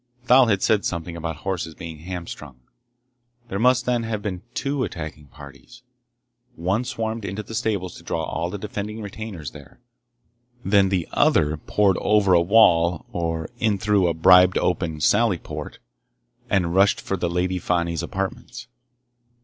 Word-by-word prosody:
Thal 125 0 +6
had 100 -4 +1
said 105 -2 +2
something 85 0 -4
about 80 -1 -4
horses 85 -4 -3
being 80 -2 -8
hamstrung. 80 -6 -8 0.9
There 100 - -3
must, 125 +2 +3
then, 125 -1 +1
have 110 -2 -4
been 95 -4 -4
two 140 -1 -1
attacking 75 - -6
parties. 75 - -14 0.7
One 95 +8 -1
swarmed 115 -2 -3
into 100 +2 -4
the 115 - -10
stables 100 -5 -2
to - - -14
draw - - -2
all 85 +1 -3
defending 105 +2 -5
retainers 100 - -7
there. - - -14 0.9
Then 100 -1 +4
the 90 -3 -1
other 75 +1 +3
poured 95 +4 +1
over 105 -3 +3
a 85 - +6
wall 85 -4 +4
or 80 -2 -3
in 110 -3 +1
through 100 -2 +2
a 85 - 0
bribed 90 +2 +6
open 85 -3 -1
sally 105 +3 +3
port, - - -8 0.7
and 90 -3 +1
rushed 100 +2 +4
for 95 - -3
the 85 -2 -2
Lady 90 +1 -1
Fani's 85 -2 -1
apartments. 120 +5 -5
95 Hz, 150 wpm, -23 LUFS, 85-105 Hz, 0.9 s, Thal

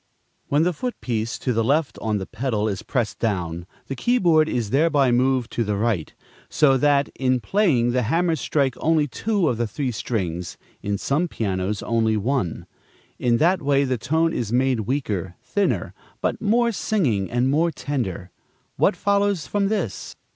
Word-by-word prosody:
When 145 +3 +2
the 180 +1 +1
foot 245 +10 -4
piece 115 -1 -2
to 125 - -1
the 115 0 +1
left 145 +5 0
on 110 -2 0
the 95 - -4
piano 115 -2 -2
is 100 -3 -3
pressed 120 -5 -2
down, 85 -6 -2 0.2
the 135 - -5
key 240 - +1
board 160 -7 +4
is 115 -4 -2
thereby 145 -3 +3
moved 125 0 +1
to 120 - 0
the 105 -1 -1
right; 100 -6 -1 0.4
so 145 -3 +4
that, 140 +1 +3
in 130 -1 +1
playing, 135 - +2
the 125 +1 +1
hammers 165 +7 +1
strike 140 -4 +1
only 155 -2 +2
two 205 - 0
of 120 - 0
the 120 0 0
three 130 +4 -3
strings, 90 -7 -3 0.2
in 100 0 -2
some 150 - 0
pianos 100 - -2
only 110 -1 +1
one. 105 - -1 0.5
In 120 -1 +2
that 175 +6 +3
way 140 -1 +2
the 130 -3 -1
tone 160 +7 +1
is 115 -3 -2
made 130 0 +2
weaker, 100 - -2
thinner, 190 +11 -1 0.3
but - - -2
more 235 +2 +2
singing 140 - 0
and 120 +2 +1
more 160 +4 +2
tender. 100 - -4 0.5
What - - +3
follows 200 -3 +1
from 200 -1 0
this? 195 - -3
130 Hz, 175 wpm, -23 LUFS, 110-160 Hz, 0.5 s, board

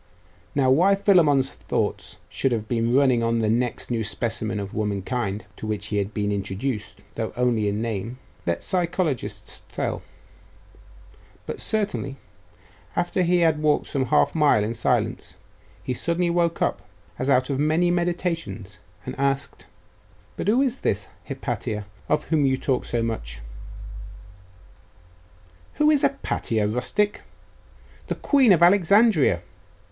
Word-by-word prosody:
Now 130 -2 +3
why 180 +9 +5
Philammon's 165 -10 +3
thoughts - - -3
should 135 - -1
have 110 -2 -2
been 115 +1 +1
running 130 -4 +4
on 115 0 +1
the 110 -2 +1
next 120 +1 -1
new 115 -2 0
specimen 110 0 -2
of 100 -1 -5
womankind 105 0 -2
to 110 - -6
whom 105 -1 0
he 105 - -4
had 100 0 -1
been 105 -1 -1
introduced, 100 +3 -3
though - - -3
only 120 -4 +2
in 105 +2 -1
name, 115 +2 -3 0.3
let 85 0 -1
psychologists 175 -6 -2
tell, - - -2 1.4
but - - -5
certainly, 205 -10 -2 0.8
after 175 +2 0
he 175 0 +3
had 160 -2 +3
walked 150 -1 +2
some 135 -2 -1
half 75 -9 +3
mile 145 -9 +4
in 110 +2 -2
silence, 115 - -1 0.5
he 130 - -2
suddenly 170 +6 0
woke 170 -1 +1
up, - - -1 0.4
as 130 - -1
out 130 0 +3
of 135 - -1
many 160 +4 +2
meditations, 170 - -2 0.3
and 130 - -4
asked 140 0 -1 0.7
'But - - -4
who 240 +6 +4
is 255 -1 -1
this 100 -1 -1 0.2
Hypatia, 105 -1 -3 0.2
of 150 - +2
whom 150 -4 +3
you 130 0 +2
talk 130 -1 -1
so 120 -1 -1
much?' - - -4 2.4
'Who 300 0 +4
is 295 -3 +3
Hypatia, 115 - 0
rustic? 125 - 0 0.9
The - - -2
queen 270 -6 +4
of 170 -2 +5
Alexandria! 200 +5 +4
130 Hz, 140 wpm, -24 LUFS, 110-175 Hz, 2.4 s, why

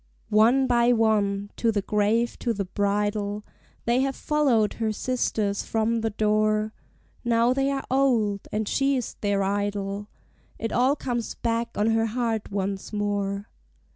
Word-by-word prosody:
One 235 +6 +5
by 240 -1 +3
one, 205 -3 +1
to 230 - +2
the 205 -2 -1
grave, 215 +4 +1
to 235 - 0
the 200 -2 -3
bridal, 205 +1 -1 0.4
They 235 +2 +2
have 270 0 0
followed 265 -9 +2
her 220 -1 +1
sisters 215 -3 -1
from 225 +1 0
the 225 - 0
door; 215 0 +1 0.5
Now 235 +1 +3
they 270 +1 +1
are 275 -1 -2
old, 235 -7 +2
and 215 0 -1
she 275 +4 +2
is 245 - -4
their 200 -1 +1
idol: 200 0 -2 0.5
It 225 - -3
all 260 +3 +3
comes 240 -5 -3
back 230 0 -2
on 215 +2 +2
her 225 0 +2
heart 225 -2 -2
once 195 -1 -3
more. 205 -1 -2
220 Hz, 150 wpm, -25 LUFS, 205-235 Hz, 0.5 s, One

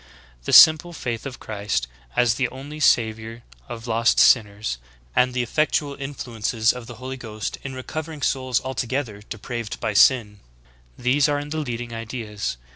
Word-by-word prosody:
The! - - -2
simple 160 +2 +8
faith 120 -4 -4
of 130 - -9
Christ 100 - -2 0.3
as 120 -2 +3
the 125 +1 0
only 145 +4 -9
Savior 115 -3 +1 0.3
of 115 -1 -7
lost 115 0 +2
sinners,j 105 - +3 0.3
and 125 0 +3
the 125 0 -1
effectual 145 +3 0
influences 120 -5 -1
of 125 -2 -9
the 120 - -9
Holy 130 +3 -7
Ghost 110 -4 -6
in 135 -1 -7
recovering\ 155 +3 -6
souls 130 -3 +1
altogether 130 -3 -3
depraved 115 +1 -6
by 110 - -2
sin 105 -1 +4 0.3
— - - -30 0.2
these 135 +4 +2
are 145 0 -1
the 155 +2 -4
leading! 120 -4 -4
ideas. 115 - -5
120 Hz, 155 wpm, -23 LUFS, 110-135 Hz, 0.3 s, simple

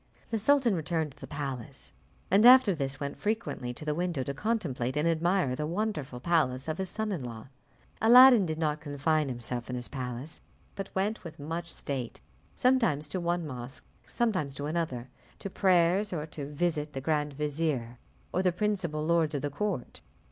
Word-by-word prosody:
The 225 - 0
sultan 260 0 +3
returned 160 -2 -1
to 140 - -21
the - - -8
palace, 135 -5 -6 0.4
and 200 +3 +5
after 250 -4 +8
this 135 -4 -3
went 140 -1 -5
frequently 210 - -2
to 150 - -8
the 150 - 0
window 170 -4 -1
to 140 - -4
contemplate 140 - -2
and 150 +3 +2
admire 165 -4 +1
the 150 +3 -3
wonderful 170 - -3
palace 135 -3 +1
of 155 +2 -3
his 190 -1 -2
son 220 +2 -3
in 170 -9 -3
law. 115 0 -8 0.5
Aladdin 240 -3 +8
did 155 -1 -3
not 155 -2 -1
confine 150 0 0
himself 120 0 -4
in 125 - -3
his 125 -1 -3
palace, 130 +2 -6 0.3
but 195 -1 -5
went 205 +3 -1
with 165 -2 -9
much 165 +3 -4
state, 130 -4 -4 0.4
sometimes 230 - +2
to 185 - -2
one 175 -1 -1
mosque, 125 -2 -8 0.2
and - - -19
sometimes 185 - 0
to 145 - -4
another, 150 -6 -2 0.3
to 195 - -6
prayers, 185 +2 +3
or 155 -4 -3
to 150 -3 -7
visit 150 0 -1
the 135 - -3
grand 150 0 0
vizier 145 -5 -2 0.3
or 185 - +2
the 185 -1 +3
principal 175 -5 -1
lords 165 -2 +2
of 145 - -3
the 145 - -2
court. 185 -3 -3
155 Hz, 185 wpm, -29 LUFS, 140-185 Hz, 0.5 s, after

